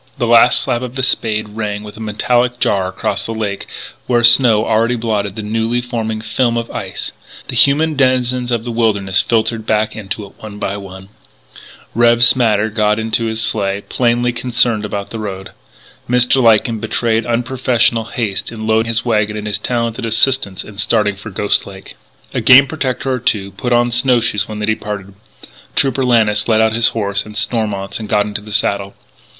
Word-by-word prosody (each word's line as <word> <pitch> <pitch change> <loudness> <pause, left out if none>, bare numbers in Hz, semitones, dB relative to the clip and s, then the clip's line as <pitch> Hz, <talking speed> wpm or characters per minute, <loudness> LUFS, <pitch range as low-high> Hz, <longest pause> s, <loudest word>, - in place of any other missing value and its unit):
The 125 - 0
last 115 +1 +5
slap 120 - -1
of 125 0 -6
the 130 - -2
spade 110 -4 0
rang 105 -1 -4
with 105 0 -10
a - - -12
metallic 120 +3 0
jar 95 -2 +1
across 95 +1 -3
the 115 - -4
lake, 105 -3 -4 0.4
where 120 -1 +2
snow 115 -2 +5
already 115 +3 +1
blotted 105 -4 -2
the 110 - -5
newly 115 +3 -1
forming 115 -3 -4
film 115 +2 0
of 115 0 -4
ice; - - -5 0.4
the - - -4
human 155 +3 +3
denizens 125 -2 +1
of 120 -2 -1
the 120 - -5
wilderness 100 -5 +1
filtered 110 -1 -1
back 110 0 0
into 105 0 -5
it 100 - -16
one 105 -1 -9
by 100 -1 -3
one; 95 -1 -10 0.8
"Rev. 120 0 +4
Smatter" 110 -4 +4
got 105 -1 +1
into 110 +1 -1
his 110 0 -2
sleigh, 100 -2 -1
plainly 120 0 +1
concerned 120 -2 0
about 100 -1 -5
the 115 - -5
road; 95 -3 -6 0.6
Mr. 125 +2 +3
Lyken 115 -1 +3
betrayed 115 +1 0
unprofessional 120 -1 0
haste 115 -3 -3
in 110 -1 -7
loading 110 +1 +2
his 115 +2 -1
wagon 105 -3 0
with 105 0 -5
his 105 -1 -2
talented 115 -1 -2
assistants 115 -3 +1
and 105 -2 -12
starting 105 -1 +1
for 105 +3 -9
Ghost 100 +1 0
Lake. 95 -1 -12 0.4
A - - -1
Game 130 +2 +8
Protector 135 -3 -3
or 125 - -2
two 100 -5 -1
put 125 +6 -4
on 120 0 +3
snow 120 +1 +3
shoes 105 -3 -1
when 110 - -7
they 105 - -2
departed. 105 -2 -4 0.6
Trooper 135 -1 +1
Lannis 110 -4 +2
led 110 -2 +3
out 110 0 +3
his 115 +1 +3
horse 100 -2 -1
and 105 -1 -10
Stormont's, 100 -4 -2
and 110 -2 -7
got 105 -1 +2
into 105 0 -4
the 105 +1 -11
saddle. 100 -1 -1
110 Hz, 185 wpm, -16 LUFS, 105-120 Hz, 0.8 s, Game